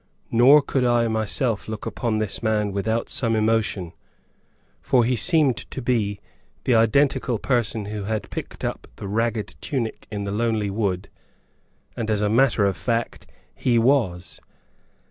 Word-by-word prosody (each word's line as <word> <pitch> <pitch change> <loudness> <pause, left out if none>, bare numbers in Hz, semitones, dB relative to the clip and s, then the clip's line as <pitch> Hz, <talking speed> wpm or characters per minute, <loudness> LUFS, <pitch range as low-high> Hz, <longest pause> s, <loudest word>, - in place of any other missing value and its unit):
Nor 135 +6 +6
could 135 -3 0
I 120 -1 +3
myself 110 +1 -1
look 110 -1 -6
upon 115 -3 -2
this 110 -2 -2
man 105 -2 0
without 110 +4 -1
some 115 -3 0
emotion, 110 -5 0 0.9
for 125 -3 +3
he 125 +2 +1
seemed 150 0 +3
to - - -6
be 110 -5 0 0.4
the 125 - +2
identical 120 +2 +2
person 115 -3 -1
who 105 -1 -5
had 105 -2 -2
picked - - -6
up - - -4
the 100 - -7
ragged 115 +1 -1
tunic 120 -6 -3
in 105 -1 -4
the 100 - -3
lonely 110 -1 0
wood, 100 -2 -1 0.9
and, 110 -1 -3
as 105 -1 +1
a 105 - +1
matter 115 -2 +3
of 100 - 0
fact, 115 -1 -2 0.3
he 120 -2 +1
was! 115 - +1
110 Hz, 150 wpm, -23 LUFS, 105-120 Hz, 0.9 s, Nor